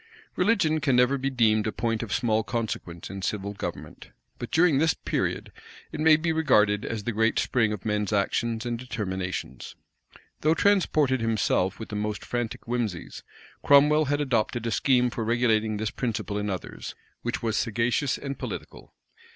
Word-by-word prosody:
Religion 165 -9 +2
can 140 -4 +1
never 125 +2 +4
be 135 0 -1
deemed 110 -4 +2
a - - 0
point 115 0 -1
of 115 -3 -6
small 110 -2 +1
consequence 105 -8 -4
in 95 0 -6
civil 100 +1 -3
government: - - -7 0.3
but - - -5
during 160 -4 +4
this 160 +1 +3
period, - - -2 0.4
it - - -6
may 155 0 +6
be 165 +1 0
regarded 105 -10 +3
as 110 -2 -4
the 120 - -1
great 110 +1 +1
spring 110 -4 +1
of 105 -1 -6
men's 105 -1 -1
actions 110 +3 0
and 120 -1 -2
determinations. 95 -7 -5 0.6
Though 155 +2 +2
transported 155 - +2
himself 110 -4 +1
with 110 - -7
the 105 - -5
most 105 0 -3
frantic 120 -2 -3
whimseys, 115 -7 -3 0.4
Cromwell 150 +2 +5
had 145 +1 0
adopted 120 -3 0
a 115 - -1
scheme 125 0 +2
for 115 - -3
regulating 110 -2 +1
this 110 0 -2
principle 110 -4 -3
in 105 0 -2
others, 95 -3 -6 0.3
which 120 0 -3
was 110 -2 0
sagacious 120 +5 0
and 140 -1 -6
political. - - -8
115 Hz, 165 wpm, -26 LUFS, 105-135 Hz, 0.6 s, may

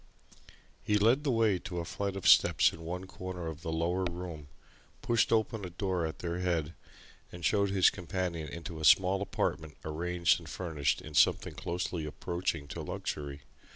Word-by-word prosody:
He 105 - +2
led 115 +7 +4
the 145 - 0
way 110 -6 +3
to 90 0 -6
a 85 - -2
flight 100 +2 -3
of 95 - -2
steps - - +6
in 80 - -10
one 90 +3 -4
corner 95 -2 -6
of 80 -1 -6
the 80 -2 -4
lower 85 +3 0
room, 85 -4 -6 0.6
pushed 115 -1 +2
open 110 -1 +1
a 90 - -4
door 90 -1 -1
at 80 -3 -7
their 85 +1 -2
head, 85 -3 -1 0.6
and 85 -1 -6
showed 100 -2 +3
his 95 -2 +5
companion 90 -4 -3
into 85 -1 -7
a - - -6
small 95 +6 +5
apartment 80 -6 -2
arranged 85 +3 +1
and 80 -3 -11
furnished 80 -4 -1
in 75 - -9
something 75 - +3
closely 85 -1 -3
approaching 85 -1 -3
to - - -5
luxury. 70 -1 -5
90 Hz, 175 wpm, -31 LUFS, 80-95 Hz, 0.6 s, steps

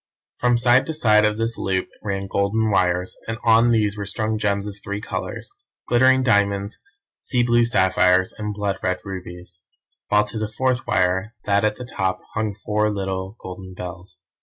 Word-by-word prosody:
From 120 -1 +3
side 120 +2 +4
to 160 - -3
side 110 -7 +4
of 105 0 +1
this 115 +1 -2
loop 95 -1 -1
ran 100 -1 -3
golden 100 +3 0
wires, 90 -1 +1
and 115 0 -3
on 115 +1 +5
these 105 -3 +2
were 100 -1 -5
strung 110 +1 -2
gems 100 -1 0
of 105 -1 -6
three 100 0 -4
colours, 115 - -5 0.4
glittering 130 +2 +4
diamonds, 100 -3 +1 0.4
sea 125 -2 0
blue 120 0 +3
sapphires, 95 -3 +3
and 105 -1 -4
blood 100 -1 -2
red 90 0 0
rubies, 90 -2 -8 0.5
while 105 0 +4
to 105 +1 -5
the 110 0 -3
fourth 130 +1 -1
wire, 95 +5 +1
that 100 0 +2
at 105 0 +1
the 125 - -8
top, 95 -5 -2
hung 110 -2 -2
four 105 +1 0
little 95 -1 -3
golden 95 0 -9
bells. 90 0 -9
105 Hz, 175 wpm, -22 LUFS, 95-115 Hz, 0.5 s, on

